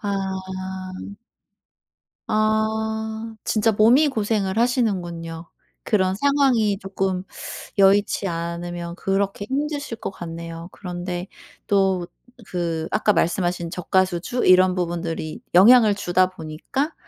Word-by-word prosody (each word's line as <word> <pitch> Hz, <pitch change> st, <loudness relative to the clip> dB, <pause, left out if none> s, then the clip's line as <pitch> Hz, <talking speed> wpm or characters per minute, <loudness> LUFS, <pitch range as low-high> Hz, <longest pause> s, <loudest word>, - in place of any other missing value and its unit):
아. 205 Hz, -, -4 dB, 2.2 s
아 220 Hz, +1 st, -1 dB
진짜 220 Hz, +1 st, +2 dB
몸이 235 Hz, +9 st, +5 dB
고생을 210 Hz, -5 st, -1 dB
하시는군요. 175 Hz, -9 st, -1 dB, 0.4 s
그런 190 Hz, -3 st, +2 dB
상황이 250 Hz, -5 st, +2 dB
조금 190 Hz, -1 st, -2 dB, 0.5 s
여의치 200 Hz, 0 st, +4 dB
않으면 170 Hz, 0 st, -4 dB
그렇게 195 Hz, +2 st, -1 dB
힘드실 285 Hz, -2 st, -2 dB
것 -, -, -4 dB
같네요. 165 Hz, -2 st, -7 dB
그런데 180 Hz, -1 st, -5 dB, 0.4 s
또 190 Hz, -3 st, +2 dB, 0.4 s
그 165 Hz, -3 st, -2 dB
아까 215 Hz, -1 st, +2 dB
말씀하신 175 Hz, 0 st, 0 dB
저가 185 Hz, +1 st, +2 dB
수주 185 Hz, +8 st, -2 dB
이런 185 Hz, 0 st, +6 dB
부분들이 170 Hz, -3 st, -3 dB
영향을 215 Hz, +3 st, +7 dB
주다 185 Hz, -1 st, +2 dB
보니까 185 Hz, -, -4 dB
195 Hz, 230 characters per minute, -23 LUFS, 175-220 Hz, 2.2 s, 영향을